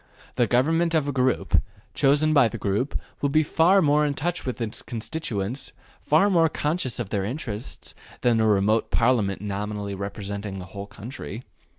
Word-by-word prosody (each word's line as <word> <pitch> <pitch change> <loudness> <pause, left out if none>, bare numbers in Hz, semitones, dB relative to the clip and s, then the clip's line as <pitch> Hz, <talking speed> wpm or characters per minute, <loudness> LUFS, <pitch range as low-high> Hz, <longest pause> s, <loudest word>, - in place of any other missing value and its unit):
The 120 - +2
government 165 +8 +2
of 150 -3 +2
a - - 0
group, 130 -1 +2 0.3
chosen 150 +2 +3
by 140 -5 +6
the 115 - -5
group, 105 +6 -1 0.2
will 140 - +2
be 155 +3 +3
far 175 +5 +4
more 150 0 +4
in 145 -1 0
touch 175 +2 -2
with 125 - -3
its 115 -2 -3
constituents, 115 0 -4 0.3
far 160 +7 +4
more 170 -5 +4
conscious 150 -4 -1
of 120 -5 -4
their 100 -2 -1
interests, 115 0 -5 0.3
than 115 -2 +3
a 110 - +3
remote 105 +2 +2
Parliament 110 -5 +2
nominally 105 0 -3
representing 100 0 -5
the 90 - -7
whole 100 0 -6
country. 115 +1 -8
120 Hz, 170 wpm, -25 LUFS, 105-150 Hz, 0.3 s, by